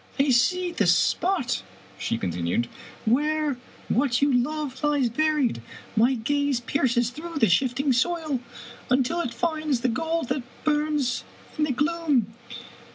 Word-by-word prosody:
" - - -20
I 275 0 +4
see 355 +9 +2
the 340 - +1
spot," 350 -9 +2 0.4
she - - -1
continued, 90 +3 -1 0.2
" - - -19
where 295 +3 +1 0.3
what 245 -1 +2
you 280 -1 +3
love 270 +2 -1
lies 290 -4 +2
buried. 295 - +1 0.3
My 240 +4 +4
gaze 285 +2 0
pierces 240 -1 +1
through 320 +4 -7
the 225 - +4
shifting 260 - +2
soil 310 +1 0 0.5
until 265 +7 +2
it 245 - -3
finds 310 0 -1
the 255 - +1
gold 325 +4 -1
that 265 +1 0 0.2
burns 295 -4 0 0.3
in 300 - +1
the 295 - -1
gloom. 290 -5 +1
275 Hz, 145 wpm, -25 LUFS, 245-310 Hz, 0.5 s, I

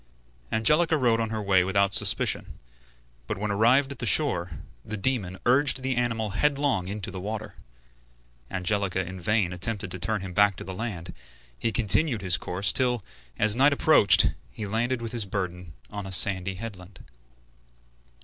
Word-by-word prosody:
Angelica 155 +8 +2
rode 120 -4 +1
on 115 -1 -2
her 110 -1 -4
way 95 -2 +3
without 100 +1 0
suspicion, - - +3 0.7
but - - -3
when 105 +1 -3
arrived 125 +7 +2
at 140 - -9
the 120 - -3
shore, 110 - +2 0.3
the 110 - -6
demon 100 -5 -2
urged 130 +1 +2
the 130 -1 -1
animal 115 -3 -2
headlong 140 -4 0
into 100 0 -5
the 95 - -7
water. 110 +2 -6 1.0
Angelica 95 0 -2
in 95 +1 -9
vain 100 -1 0
attempted 100 +1 -2
to 90 - -5
turn 105 +3 -1
him 95 -1 -7
back 100 0 +3
to - - -9
the 95 - -7
land; 90 -5 -6 0.4
he 115 - -2
continued 115 +1 +1
his 90 -3 +2
course 90 +4 -2
till, 125 -4 +1 0.3
as 105 0 +4
night 140 +3 +4
approached, 140 - +5 0.2
he 110 - -7
landed 115 +4 -2
with 115 - -5
his 115 -4 -3
burden 90 -3 -5 0.2
on 100 -1 -6
a - - -8
sandy 95 0 +3
headland. 95 -3 -10
105 Hz, 165 wpm, -25 LUFS, 95-120 Hz, 1.0 s, approached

